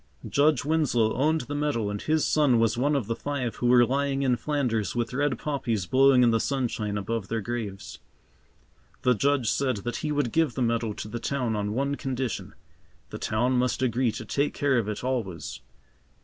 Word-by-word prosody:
Judge 145 -1 +2
Winslow 145 -8 +2
owned 155 +3 +1
the 140 +4 -6
meadow 145 -8 -1
and 105 - -4
his 155 0 +1
son 140 -6 +3
was 115 -1 +2
one 145 +5 +1
of 135 -6 0
the 115 +2 -2
five 130 -5 -3
who 120 - 0
were 120 0 +6
lying 140 +1 0
in 130 -2 +3
Flanders 120 -5 -1
with 120 0 -2
red 145 +1 0
poppies 120 - -2
blowing 130 +4 +5
in 120 - +5
the 115 - +2
sunshine 115 -6 -2
above 100 0 -3
their 115 +3 -2
graves. 105 -3 -5 1.0
The 125 - +4
Judge 135 0 +1
said 130 -4 0
that 120 - -2
he 150 - -3
would 145 -5 0
give 160 -7 +1
the 130 - 0
meadow 115 -2 0
to 105 - -7
the 120 +2 -5
town 125 -3 -1
on 105 0 -2
one 140 +2 0
condition. 130 -4 -4 0.6
The - - -6
town 120 +4 0
must 125 0 0
agree 125 -1 +1
to 115 - -6
take 140 +7 -1
care 135 -3 +2
of 110 - -3
it 105 - -5
always. 120 -9 -3
125 Hz, 195 wpm, -26 LUFS, 115-140 Hz, 1.0 s, were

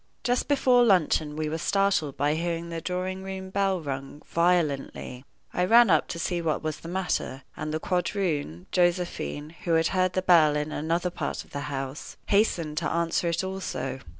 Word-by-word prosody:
Just 245 0 +1
before 255 -4 +4
luncheon 160 -7 +2
we 155 0 -2
were 160 +2 -3
startled 195 -7 +1
by 145 +1 +2
hearing 170 +1 -2
the 165 -1 -4
drawing 185 +2 -3
room 190 0 -6
bell 195 -1 +1
rung 140 -1 -6
violently. 155 -7 0 0.3
I 180 - +1
ran 230 +1 +6
up - - +3
to - - -5
see 175 +1 -1
what 160 -2 -1
was 155 -1 -3
the - - -10
matter, 175 -7 -2
and 155 - -4
the 155 - -1
quadroon, 170 - -1
Josephine, 175 -4 0
who 170 - +1
had 165 0 +3
heard 185 -1 +1
the 185 - 0
bell 160 -5 +5
in 150 +1 -2
another 170 +4 -1
part - - -4
of - - -23
the 140 - -4
house, 135 0 -5
hastened 170 -7 +1
to - - -1
answer 170 +1 0
it 170 +2 0
also. 190 -7 -4
170 Hz, 180 wpm, -27 LUFS, 155-185 Hz, 0.3 s, ran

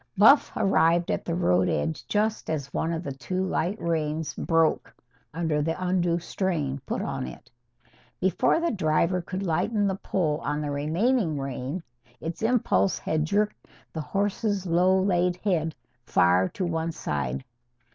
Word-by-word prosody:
Buff 230 +9 +6
arrived 170 -2 +3
at - - -1
the 170 - -1
road 90 - +2
edge 160 -1 -2
just 215 +1 0
as 140 -3 -3
one 165 - 0
of 165 +1 -3
the 140 - -4
two 185 +8 -3
light 185 +2 -1
reins 160 -2 -1
broke 165 -1 +1 0.4
under 160 -2 0
the 160 +3 -1
undue 180 -2 +1
strain 165 -6 -2
put - - -2
on 65 - -3
it. - - -11 0.7
Before 190 - +2
the 340 0 0
driver 170 -1 +1
could 185 +3 -5
lighten 205 +5 +1
the 195 - +1
pull 165 -5 -1
on 150 -2 -2
the 150 -1 -2
remaining 165 - +1
rein 135 +4 -4 0.4
its 165 +1 -5
impulse 215 - +2
had 155 -1 -1
jerked 205 +5 -1 0.3
the 160 - -3
horse's 200 +2 -1
low 180 +2 +3
laid 180 -2 +2
head 170 -5 -1 0.3
far 90 +2 +3
to 185 - -3
one 165 -1 -1
side. 70 - -3
170 Hz, 155 wpm, -26 LUFS, 150-190 Hz, 0.7 s, Buff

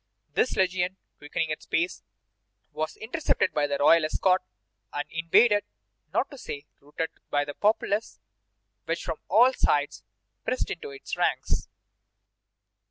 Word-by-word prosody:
This 255 - +2
legion, 185 0 +1 0.2
quickening 155 +2 -2
its 155 - -5
pace, 170 +2 0 0.7
was 155 +1 -3
intercepted 280 +8 0
by 145 -1 +2
the 140 -1 -1
royal 165 +3 +6
escort, 185 +4 +2 0.5
and 145 0 -3
invaded, 205 +6 +4 0.5
not - - 0
to 280 - -10
say 145 -8 -6 0.2
routed, 150 +3 -4 0.2
by 145 0 +1
the 145 - -6
populace, 205 - 0 0.7
which 165 +1 -2
from 165 -3 -3
all 240 +7 +6
sides 145 - +1 0.4
pressed - - -1
into 450 - -5
its 415 -1 -6
ranks. - - 0
170 Hz, 130 wpm, -27 LUFS, 150-210 Hz, 0.7 s, royal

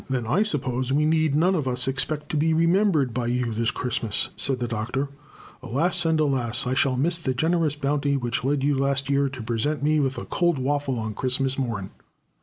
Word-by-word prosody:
"Then 130 -3 -1
I 140 - +2
suppose 130 - -1
we 150 +2 +2
need 155 -2 +2
none 175 +5 +3
of 155 -7 -1
us 125 0 +1
expect 150 +3 -2
to - - -3
be 160 +2 +2
remembered 165 - +2
by 120 -1 -2
you 120 -1 -1
this 115 +1 0
Christmas," 115 -4 -1
said 135 -2 0
the 120 -1 -3
Doctor. 120 +5 -2 0.5
"Alas, 165 +8 0
and 160 -1 +2
alas! 125 -6 +2
I 125 - 0
shall 130 0 +2
miss 170 +5 0
the 130 -5 -1
generous 160 +1 +1
bounty 140 0 0
which 120 -2 -2
led 135 +1 0
you 145 0 +2
last 140 0 0
year 140 0 +2
to 130 -3 -8
present 120 +7 -1
me 155 +1 +3
with 135 -2 0
a - - -5
cold 175 -3 +1
waffle 135 0 -1
on 110 -1 -3
Christmas 130 +3 0
morn." 115 -7 -3
135 Hz, 210 wpm, -24 LUFS, 125-150 Hz, 0.5 s, none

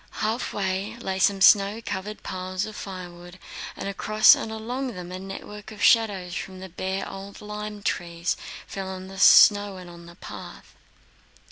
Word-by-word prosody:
Halfway 205 -2 -2
lay 190 -5 -3
some 195 0 +3
snow 200 +2 +6
covered 210 -1 -5
piles 185 +1 -3
of 215 -1 -8
firewood 175 -2 -8 0.4
and - - -5
across 215 +2 +5
and 220 - -2
along 245 +3 -4
them 180 0 -8
a 185 - -5
network 200 +2 -8
of 210 - -6
shadows 200 -6 +3
from 185 0 -6
the 190 0 -8
bare 190 +3 -3
old 195 +1 -9
lime 210 0 -7
trees 170 -2 -1 0.3
fell 195 -1 -6
on 190 0 -7
the 195 0 -9
snow 205 0 +7
and 180 -1 -10
on 170 0 -13
the 170 - -13
path. - - -10
195 Hz, 160 wpm, -25 LUFS, 185-210 Hz, 0.4 s, snow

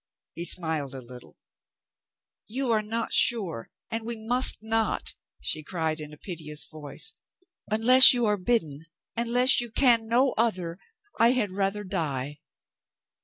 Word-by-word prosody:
He 170 - -4
smiled 160 -6 0
a - - -7
little. 125 0 -15 1.1
"You 255 +2 -3
are 220 -1 +1
not 225 +2 -5
sure 190 - +2 0.2
and 225 0 -4
we 235 0 -6
must 245 +4 +4
not," 225 0 -2 0.3
she 155 - -2
cried 160 -1 -4
in 150 -1 -9
a 150 - -14
piteous 155 -3 -4
voice. 155 - -3 0.6
"Unless 245 +5 +7
you 245 -2 0
are 210 -1 0
bidden, 165 -8 -2 0.3
unless 245 +2 +4
you 240 - -6
can 230 -1 +2
no 250 +4 +1
other, 185 -7 -2 0.4
I 235 +2 +4
had 220 -7 -1
rather 195 +2 -3
die." 145 -7 -5
210 Hz, 140 wpm, -25 LUFS, 160-235 Hz, 1.1 s, Unless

